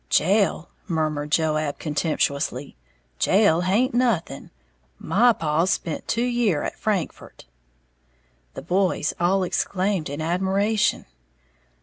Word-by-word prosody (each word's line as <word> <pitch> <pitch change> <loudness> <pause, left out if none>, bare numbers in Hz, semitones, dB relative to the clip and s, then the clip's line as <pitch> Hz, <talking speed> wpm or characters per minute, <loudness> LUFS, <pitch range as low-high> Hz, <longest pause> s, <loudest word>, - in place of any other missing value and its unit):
"Jail," 190 -1 +2 0.2
murmured 155 -4 -1
Joab, 155 -2 0
contemptuously, 145 -3 -2 0.4
"jail 190 -4 +3
haint 215 +9 +1
nothing! 230 - -1 0.5
My 240 - +3
paw's 165 -2 0
spent 165 -4 -3
two 230 +1 0
year 240 -10 +1
at - - -4
Frankfort!" 200 - -3 1.1
The - - -7
boys 180 -2 0
all 190 +2 +2
exclaimed 185 -1 -1
in 145 +2 -5
admiration. 190 +6 0
180 Hz, 100 wpm, -23 LUFS, 155-205 Hz, 1.1 s, jail